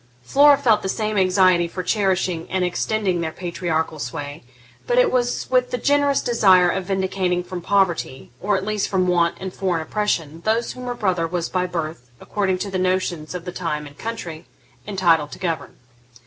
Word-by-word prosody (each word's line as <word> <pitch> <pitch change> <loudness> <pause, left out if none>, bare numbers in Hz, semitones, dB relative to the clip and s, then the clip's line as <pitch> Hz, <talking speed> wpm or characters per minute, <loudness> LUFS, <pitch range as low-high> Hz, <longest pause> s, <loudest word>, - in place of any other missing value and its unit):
Flora 285 - +6
felt 235 -7 +3
the 190 - -3
same 215 +1 -1
anxiety 185 -2 +4
for 185 +2 -5
cherishing 185 -4 0
and 185 0 0
extending 185 0 -1
their 160 -1 -2
patriarchal 165 -3 -3
sway, 145 +4 -5 0.5
but - - +1
it - - +5
was 245 -1 0
with 250 -1 +3
the 250 - -2
generous 285 +2 +2
desire 190 -7 +5
of 190 -1 -3
vindicating 190 -2 -1
from 180 0 -6
poverty, 185 -8 0
or 205 +1 +1
at 190 - -4
least 215 -1 -1
from 185 -2 +1
want 170 -1 +2
and 190 -1 -6
foreign 180 -4 -1
oppression, 165 -5 -2
those 225 +2 0
whom 250 0 -8
her 245 - -2
brother 180 -7 0
was 170 0 -3
by 180 -1 0
birth, 160 -7 -5
according 195 -3 -1
to 200 +2 -4
the 185 - -1
notions 185 -3 -1
of 180 -1 -6
the 180 - -4
time 165 -4 -3
and 145 0 -14
country, 175 -8 -6 0.4
entitled 170 -7 +2
to - - -8
govern. 170 -4 -3
185 Hz, 185 wpm, -22 LUFS, 170-210 Hz, 0.5 s, Flora